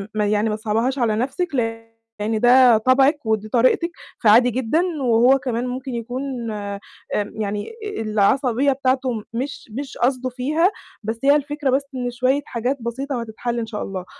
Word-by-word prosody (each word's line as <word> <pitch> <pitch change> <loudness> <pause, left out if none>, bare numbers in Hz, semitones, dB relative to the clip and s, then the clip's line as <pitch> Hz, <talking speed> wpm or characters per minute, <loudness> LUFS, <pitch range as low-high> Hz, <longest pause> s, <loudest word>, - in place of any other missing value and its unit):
يعني 210 +1 +1
ما 210 - -1
تصعبيهاش 225 +5 -1
على 220 -3 +2
نفْسِك 275 +7 -2
لإن 225 -2 -3
ده 245 -1 +6
طبعِك 265 +4 +3
ودي 215 -1 -1
طريقتِك 255 +9 +2 0.3
فعادي 230 +3 +6
جدًا، 260 +7 +1 0.2
وهو 245 +2 +5
كمان 250 -1 -2
ممكن 255 0 -5
يكون 245 +3 -4 0.3
آمم 200 -1 -5 0.6
يعني 205 - -3 0.3
العصبية 235 +5 +2
بتاعته 260 -1 0 0.2
مش 260 +5 -4
مش 280 -1 -7
قصده 255 +1 0
فيها، 300 +9 +1 0.3
بس 225 +2 -3
هي 280 +1 +6
الفكرة 295 -1 -1
بس 265 +2 +2
إن 245 -1 -2
شوية 255 +4 +1
حاجات 250 +4 -2
بسيطة 260 +4 -3
وهتتحل 235 +1 -4
إن 230 - -2
شاء 220 -2 -5
الله. 185 -2 -5
245 Hz, 150 wpm, -21 LUFS, 225-265 Hz, 0.6 s, ده